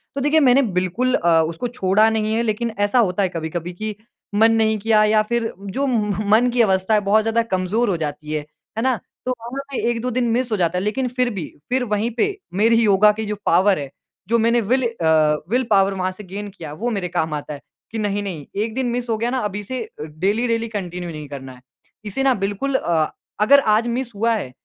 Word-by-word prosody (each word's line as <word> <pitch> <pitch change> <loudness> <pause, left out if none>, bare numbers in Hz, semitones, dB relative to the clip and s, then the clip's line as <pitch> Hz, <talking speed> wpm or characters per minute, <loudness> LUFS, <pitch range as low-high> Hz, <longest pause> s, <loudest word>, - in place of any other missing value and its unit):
तो 280 - -2
देखिए 295 +3 +3
मैंने 270 -1 +5 0.2
बिल्कुल 230 +8 0
अ, 165 -1 +3
उसको 165 +8 -2
छोड़ा 215 -2 +2
नहीं 220 0 0
है 230 - +1
लेकिन 230 +1 -1
ऐसा 205 +5 +3
होता 195 +2 0
है 185 - +1
कभी-कभी 170 +1 -4
कि 215 +3 -5 0.4
मन 225 +2 +5
नहीं 220 -1 +2
किया 215 0 +3
या 215 0 +4
फ़िर 235 -1 0
जो 200 +8 -3
म 210 -4 -1
मन 240 +3 +5
की 240 - +3
अवस्था 190 0 +2
है 210 - +5
बहुत 205 +2 +3
ज़्यादा 225 +1 +2
कमज़ोर 190 +5 +1
हो 180 - 0
जाती 150 -1 -5
है। 155 - 0 0.4
है - - 0
ना? 260 -2 +2 0.3
तो 255 - 0
वहाँ 235 -1 -6
ना 275 -1 -4
एक-दो 240 +1 -2
दिन 245 0 0
मिस 245 +1 0
हो 215 - +1
जाता 175 0 +1
है। 185 - -1
लेकिन 250 +5 -1
फ़िर 250 0 0
भी 175 -6 -4 0.2
फ़िर 255 0 +1
वहीं 215 +1 -1
पे 400 +8 +1 0.2
मेरी 230 +2 +4
योगा 210 0 +5
की 220 +1 -4
जो 210 0 -3
पावर 185 +1 +4
है, 140 -2 -5 0.4
जो 235 +2 +3
मैंने 235 +1 +3
विल 255 +5 +1
अ, 160 -7 +2
विल 250 +3 +2
पावर 195 -1 +4
वहाँ 185 -1 -1
से 205 +3 -11
गेन 200 +2 -6
किया, 165 -6 -9
वो 235 +10 -2
मेरे 195 -6 -2
काम 160 -2 -1
आता 150 0 -4
है। 140 - -9 0.3
कि 225 - -4
नहीं, 205 -1 -1
नहीं 165 -8 -5 0.2
एक 220 0 -4
दिन 260 -1 0
मिस 245 0 -3
हो 225 - +2
गया 230 +2 -1
ना 260 - -1
अब 200 - -3
इसे 210 +5 -4
अ, - - -10
डेली 195 +10 -1
डेली 230 0 0
कंटिन्यू 180 -5 -5
नहीं 150 -1 -7
करना 135 -2 -8
है। 125 - -17 0.4
इसे 210 +7 -2
ना 265 -1 +4
बिल्कुल 205 +8 -1
अ, 165 -9 +1 0.3
अगर 280 +6 +7 0.2
आज 230 +2 +1
मिस 240 0 -2
हुआ 230 +3 +2
है, 160 -12 -4
215 Hz, 235 wpm, -21 LUFS, 185-235 Hz, 0.4 s, अगर